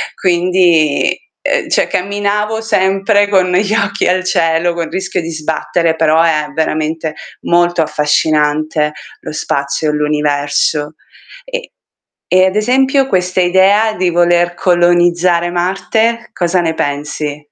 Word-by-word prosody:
Quindi, 175 Hz, -4 st, +2 dB, 0.3 s
ehm, -, -, -1 dB
cioè -, -, +1 dB
camminavo 205 Hz, +3 st, -2 dB
sempre 205 Hz, -1 st, +1 dB
con 185 Hz, -2 st, +2 dB
gli 200 Hz, +3 st, +1 dB
occhi 200 Hz, -3 st, 0 dB
al 185 Hz, +1 st, +1 dB
cielo, 170 Hz, -1 st, +1 dB
col 170 Hz, -1 st, -4 dB
rischio 190 Hz, -1 st, -3 dB
di 165 Hz, -, -6 dB
sbattere, 160 Hz, +1 st, -1 dB
però 160 Hz, 0 st, +3 dB
è 155 Hz, -2 st, +1 dB
veramente 155 Hz, 0 st, -2 dB, 0.3 s
molto 175 Hz, 0 st, +1 dB
affascinante 150 Hz, 0 st, 0 dB, 0.3 s
lo -, -, -7 dB
spazio 140 Hz, 0 st, -2 dB
e -, -, -1 dB
l'universo. 150 Hz, 0 st, -1 dB, 0.5 s
E -, -, -6 dB, 0.7 s
e 185 Hz, 0 st, +5 dB
ad 190 Hz, -, -1 dB
esempio 265 Hz, +5 st, +2 dB
questa 180 Hz, -6 st, 0 dB
idea 195 Hz, +5 st, +3 dB
di 185 Hz, -3 st, 0 dB
voler 175 Hz, 0 st, +2 dB
colonizzare 175 Hz, 0 st, +2 dB
Marte, 220 Hz, +7 st, -1 dB
cosa 175 Hz, -1 st, 0 dB
ne 165 Hz, -1 st, -1 dB
pensi? 145 Hz, 0 st, -3 dB
175 Hz, 125 wpm, -14 LUFS, 155-190 Hz, 0.7 s, e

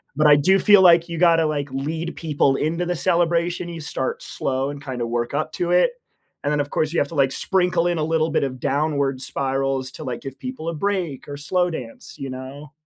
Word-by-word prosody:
but 155 Hz, +1 st, +4 dB
I 145 Hz, -, +8 dB
do 190 Hz, +7 st, +4 dB
feel 205 Hz, -2 st, +6 dB
like 170 Hz, -1 st, +6 dB
you 170 Hz, -, -4 dB
gotta, 165 Hz, -1 st, +4 dB
like, 145 Hz, -2 st, -2 dB
lead 160 Hz, +5 st, -3 dB
people 145 Hz, -4 st, +1 dB
into 165 Hz, +5 st, -1 dB
the 175 Hz, 0 st, -1 dB
celebration, 175 Hz, 0 st, +1 dB
you 165 Hz, -2 st, -7 dB
start 130 Hz, -3 st, -3 dB
slow 135 Hz, +1 st, -2 dB
and 145 Hz, 0 st, -8 dB
kinda 125 Hz, -3 st, -3 dB
work 120 Hz, +1 st, -2 dB
up 155 Hz, +2 st, -1 dB
to 175 Hz, 0 st, -1 dB
it, 180 Hz, -, +4 dB, 0.5 s
and 145 Hz, -, 0 dB
then, 150 Hz, -, +1 dB
of 145 Hz, -, -1 dB
course, 155 Hz, +2 st, -1 dB
you -, -, +2 dB
have 145 Hz, -, +1 dB
to, 165 Hz, -, -8 dB
like, 135 Hz, -1 st, +3 dB
sprinkle 180 Hz, -1 st, +1 dB
in 175 Hz, -, 0 dB
a 155 Hz, -, 0 dB
little 160 Hz, 0 st, +1 dB
bit 150 Hz, -, +1 dB
of 130 Hz, -2 st, -3 dB
downward 140 Hz, -1 st, 0 dB
spirals 135 Hz, -1 st, -1 dB
to, 155 Hz, -, -8 dB
like, 125 Hz, -3 st, -5 dB
give 135 Hz, -1 st, -8 dB
people 255 Hz, -10 st, -5 dB
a -, -, -3 dB
break 175 Hz, -6 st, -2 dB
or 145 Hz, -, -6 dB
slow 180 Hz, +5 st, 0 dB
dance, 120 Hz, -7 st, -8 dB
you 135 Hz, -, -5 dB
know? 130 Hz, +3 st, -8 dB
150 Hz, 230 wpm, -22 LUFS, 135-170 Hz, 0.5 s, I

